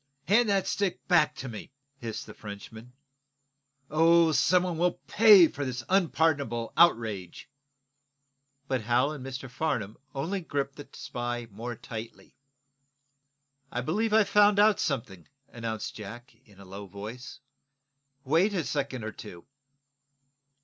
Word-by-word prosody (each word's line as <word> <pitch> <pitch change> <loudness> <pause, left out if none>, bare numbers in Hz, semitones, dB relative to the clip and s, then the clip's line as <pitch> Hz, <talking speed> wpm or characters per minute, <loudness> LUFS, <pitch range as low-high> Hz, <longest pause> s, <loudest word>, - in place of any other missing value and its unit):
Hand 215 +4 +4
that 195 -1 +2
stick 200 -3 -2
back 155 -4 +3
to 135 - -7
me!" 110 -4 -8 0.3
hissed 115 -2 -5
the 105 - -11
Frenchman. 110 +3 -10 1.0
"Oh, 165 +1 +5
some 180 +3 +3
one 180 -2 -2
shall 175 +1 +2
pay 210 -6 +7
for 145 - -5
this 125 -3 -4
unpardonable 155 - +1
outrage!" 110 - +2 1.2
But 130 -3 -1
Hal 120 +6 +2
and 150 -4 -7
Mr. 135 0 -6
Farnum 125 -6 -3 0.2
only 180 +8 -2
gripped 140 -4 -3
the 145 - -9
spy 120 0 -4
the 110 - -23
more 120 +4 -6
tightly. 115 0 -9 1.4
"I 120 - -2
believe 210 - -1
I've 215 -2 +4
found 205 0 +5
out 210 0 +5
something," 110 - -3 0.2
announced 115 -2 -5
Jack, 115 +5 -10
in 100 -3 -20
a 100 - -12
low 100 +2 -9
voice. 110 +7 -9 0.8
"Wait 170 +9 +2
a 175 - 0
second 135 -6 -3
or 110 - -4
two." 90 -5 -11
135 Hz, 135 wpm, -28 LUFS, 115-170 Hz, 1.4 s, pay